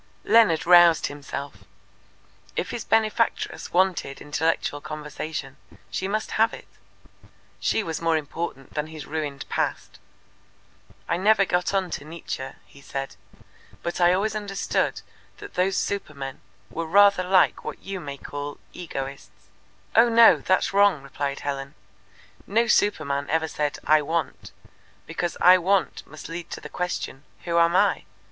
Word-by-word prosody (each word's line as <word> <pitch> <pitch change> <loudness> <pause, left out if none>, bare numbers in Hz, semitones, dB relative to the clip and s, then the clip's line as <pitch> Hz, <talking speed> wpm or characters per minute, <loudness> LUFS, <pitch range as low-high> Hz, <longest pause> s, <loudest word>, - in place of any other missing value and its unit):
Leonard 180 -7 +4
roused 175 -1 +7
himself. 145 0 -7 0.9
If - - -2
his 235 - -4
benefactress 225 +1 0
wanted 180 -6 +1
intellectual 150 -1 -1
conversation, 150 -2 -6 0.3
she 190 - -2
must 215 +2 -2
have 225 +1 +3
it. - - -14 0.9
She 220 - +1
was 165 -4 -4
more 165 -1 +2
important 145 -2 -6
than 150 0 -2
his 155 -2 -9
ruined 150 -3 -4
past. - - -3 1.1
"I 170 - 0
never 200 +1 +4
got 180 -1 0
on 190 -2 0
to - - -4
Nietzsche," 150 -4 -6 0.2
he 140 - -18
said. 135 -4 -5 0.7
"But 170 +1 -3
I 175 0 +6
always 205 +3 0
understood 200 -2 -1 0.4
that 410 -1 -10
those 190 +1 +1
supermen 140 -9 -4 0.3
were 165 0 -4
rather 200 0 +5 0.3
what - - -6
you 195 -1 -5
may 140 -4 -7
call 145 +1 -6 0.2
egoists." 140 -5 -7 0.5
"Oh, 235 +1 +6
no, 230 -7 +7
that's 185 +7 +1
wrong," 200 -7 +4
replied 140 0 -4
Helen. 140 0 -4 0.7
"No 230 +3 +2
superman 150 -11 +1
ever 160 0 +1
said 150 -2 -2
'I 155 0 +5
want,' 160 +2 -3 0.5
because 170 +1 -3
'I 185 +1 +8
want' 190 +1 0
must 155 - -10
lead 170 +1 -7
to - - -6
the - - -10
question, 180 -6 -4 0.2
'Who 170 -1 +2
am 170 +1 +4
I?' - - +3
165 Hz, 140 wpm, -25 LUFS, 145-195 Hz, 1.1 s, I